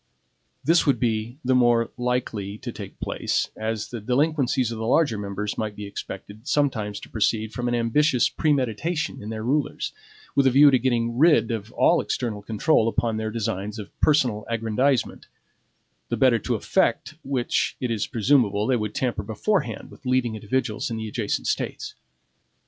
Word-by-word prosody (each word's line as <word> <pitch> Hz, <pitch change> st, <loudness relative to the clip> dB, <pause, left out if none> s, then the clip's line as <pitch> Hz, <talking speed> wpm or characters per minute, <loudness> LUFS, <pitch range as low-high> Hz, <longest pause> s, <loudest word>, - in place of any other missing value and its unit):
This 165 Hz, +3 st, +3 dB
would 140 Hz, -, +3 dB
be 115 Hz, 0 st, -1 dB
the 130 Hz, -, +3 dB
more 120 Hz, -2 st, +3 dB
likely 120 Hz, -5 st, -2 dB
to -, -, -6 dB
take -, -, -9 dB
place, -, -, -1 dB
as 110 Hz, -1 st, -3 dB
the 120 Hz, -3 st, -5 dB
delinquencies 130 Hz, 0 st, +1 dB
of 115 Hz, -, -5 dB
the 110 Hz, -, -2 dB
larger 135 Hz, -2 st, +3 dB
members 105 Hz, 0 st, -4 dB
might 110 Hz, -2 st, -3 dB
be 105 Hz, -, -6 dB
expected 100 Hz, +3 st, -8 dB
sometimes 110 Hz, -9 st, 0 dB
to -, -, -11 dB
proceed 110 Hz, 0 st, 0 dB
from 125 Hz, 0 st, -2 dB
an 120 Hz, -, +1 dB
ambitious 125 Hz, +4 st, +3 dB
premeditation 150 Hz, -, -1 dB
in 105 Hz, -, -7 dB
their 110 Hz, -1 st, -4 dB
rulers, 140 Hz, +5 st, -1 dB, 0.4 s
with 140 Hz, -1 st, +4 dB
a -, -, +7 dB
view 140 Hz, +3 st, +7 dB
to 130 Hz, -, +4 dB
getting 120 Hz, -1 st, 0 dB
rid 155 Hz, -5 st, +5 dB
of 110 Hz, 0 st, -4 dB
all 170 Hz, -, +4 dB
external 110 Hz, -5 st, -3 dB
control 110 Hz, +4 st, +2 dB
upon 115 Hz, -1 st, 0 dB
their 110 Hz, 0 st, -2 dB
designs 105 Hz, -1 st, -3 dB
of 105 Hz, -2 st, -9 dB
personal 125 Hz, -8 st, +3 dB
aggrandizement; 115 Hz, +3 st, 0 dB, 0.8 s
the 120 Hz, -, -1 dB
better 120 Hz, -1 st, +4 dB
to -, -, -1 dB
effect -, -, 0 dB
which 130 Hz, -3 st, -1 dB
it 125 Hz, -2 st, -2 dB
is 110 Hz, -3 st, -1 dB
presumable 115 Hz, -4 st, +2 dB
they 125 Hz, +1 st, +2 dB
would 105 Hz, -1 st, -4 dB
tamper 120 Hz, -5 st, -1 dB
beforehand 150 Hz, -, -2 dB
with 130 Hz, -, -12 dB
leading 125 Hz, -2 st, +1 dB
individuals 110 Hz, +1 st, -2 dB
in 115 Hz, -, -3 dB
the 110 Hz, 0 st, -4 dB
adjacent 110 Hz, -1 st, -2 dB
States. -, -, -2 dB
115 Hz, 170 wpm, -24 LUFS, 110-130 Hz, 0.8 s, a